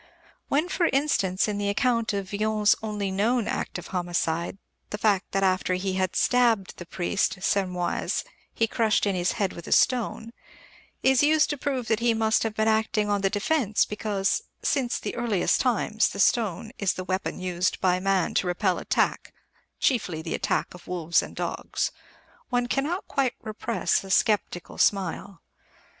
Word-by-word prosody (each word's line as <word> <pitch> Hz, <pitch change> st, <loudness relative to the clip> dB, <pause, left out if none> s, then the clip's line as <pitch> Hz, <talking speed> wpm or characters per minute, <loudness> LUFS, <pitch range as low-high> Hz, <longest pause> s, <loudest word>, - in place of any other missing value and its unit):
When, 300 Hz, +5 st, +1 dB
for 360 Hz, -2 st, +1 dB
instance, 240 Hz, -, +1 dB
in 205 Hz, -1 st, -2 dB
the 200 Hz, 0 st, 0 dB
account 230 Hz, +1 st, +1 dB
of 200 Hz, -2 st, -4 dB
Villon's 210 Hz, 0 st, +2 dB
only 210 Hz, -3 st, -3 dB
known 220 Hz, +4 st, +1 dB
act -, -, -3 dB
of 175 Hz, -, -9 dB
homicide, 175 Hz, -1 st, -1 dB, 0.3 s
the 210 Hz, -, -4 dB
fact 205 Hz, -3 st, +1 dB
that 195 Hz, -, 0 dB
after 185 Hz, -1 st, +1 dB
he 190 Hz, +1 st, -2 dB
had 185 Hz, -1 st, -1 dB
stabbed 235 Hz, -6 st, +2 dB
the 175 Hz, -, -9 dB
priest, 190 Hz, +3 st, -1 dB
Sermoise, 180 Hz, -4 st, 0 dB, 0.3 s
he 225 Hz, -, +1 dB
crushed 220 Hz, -1 st, +1 dB
in 200 Hz, -, +1 dB
his 180 Hz, 0 st, 0 dB
head 200 Hz, -4 st, -1 dB
with 170 Hz, -, -10 dB
a -, -, -7 dB
stone, 235 Hz, -2 st, +2 dB, 0.7 s
is 265 Hz, -1 st, +4 dB
used 310 Hz, +1 st, +4 dB
to -, -, -1 dB
prove 260 Hz, -3 st, -2 dB
that 220 Hz, -1 st, +1 dB
he 235 Hz, -1 st, +2 dB
must 220 Hz, 0 st, +2 dB
have 225 Hz, -1 st, -2 dB
been 220 Hz, 0 st, +1 dB
acting 220 Hz, -1 st, +1 dB
on 205 Hz, -1 st, +1 dB
the 195 Hz, -, +2 dB
defensive, 215 Hz, +1 st, +1 dB
because, 205 Hz, -2 st, 0 dB, 0.2 s
"since 260 Hz, -4 st, +1 dB
the -, -, -5 dB
earliest 230 Hz, -6 st, +1 dB
times, 220 Hz, -3 st, +1 dB
the -, -, -7 dB
stone 215 Hz, 0 st, +1 dB
is 200 Hz, -2 st, +1 dB
the 185 Hz, -, -4 dB
weapon 185 Hz, +1 st, -3 dB
used 180 Hz, 0 st, -1 dB
by 180 Hz, -1 st, +2 dB
man 190 Hz, -2 st, +1 dB
to 185 Hz, -, +1 dB
repel 180 Hz, +1 st, 0 dB
attack -, -, 0 dB, 0.5 s
chiefly 180 Hz, -, 0 dB
the 165 Hz, -, -4 dB
attack -, -, -1 dB
of 180 Hz, -, -14 dB
wolves 170 Hz, -2 st, +1 dB
and -, -, -9 dB
dogs" -, -, -2 dB, 0.6 s
one 245 Hz, -1 st, +1 dB
cannot 290 Hz, +9 st, -2 dB
quite 270 Hz, -3 st, 0 dB
repress 220 Hz, 0 st, -1 dB
a 195 Hz, -, -10 dB
sceptical 190 Hz, -2 st, 0 dB
smile. 195 Hz, -2 st, 0 dB
205 Hz, 170 wpm, -26 LUFS, 185-230 Hz, 0.7 s, is